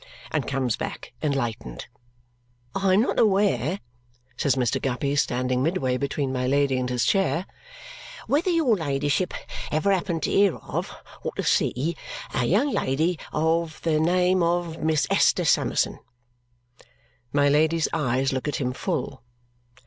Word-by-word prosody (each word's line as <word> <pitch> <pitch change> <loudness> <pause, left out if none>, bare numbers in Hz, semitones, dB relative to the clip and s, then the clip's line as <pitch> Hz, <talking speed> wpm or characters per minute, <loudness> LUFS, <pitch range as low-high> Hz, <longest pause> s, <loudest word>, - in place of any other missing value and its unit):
And - - -1
comes 130 -4 0
back - - -6
enlightened. 120 - -2 0.9
"I 195 -1 +2
am 205 - +5
not 240 - 0
aware," 195 - +2 0.6
says 135 +1 +1
Mr. 125 -4 0
Guppy, 140 +2 -1
standing 125 -2 +1
midway 135 -5 0
between 140 0 -2
my 125 -1 -1
Lady 140 -1 +2
and 125 0 -2
his 125 -1 0
chair, 195 -2 +1 0.8
"whether 315 +6 +1
your 320 -10 +3
ladyship 145 +1 0 0.4
ever 155 +6 +2
happened 175 -3 -1
to - - 0
hear 200 -3 +4
of, - - -5 0.3
or - - -3
to - - -2
see, 155 +7 +1 0.4
a 125 - +1
young 220 - +2
lady 155 - 0
of 160 +1 0
the 155 -2 +2
name 180 +3 +3
of 170 -1 0
Miss 155 -1 +1
Esther - - +3
Summerson." - - +1 1.3
My 145 0 +3
Lady's 155 +3 +3
eyes 135 -2 +1
look 130 +2 -2
at 150 - -1
him 125 -2 -1
full. 130 +1 -3
150 Hz, 140 wpm, -25 LUFS, 130-180 Hz, 1.3 s, am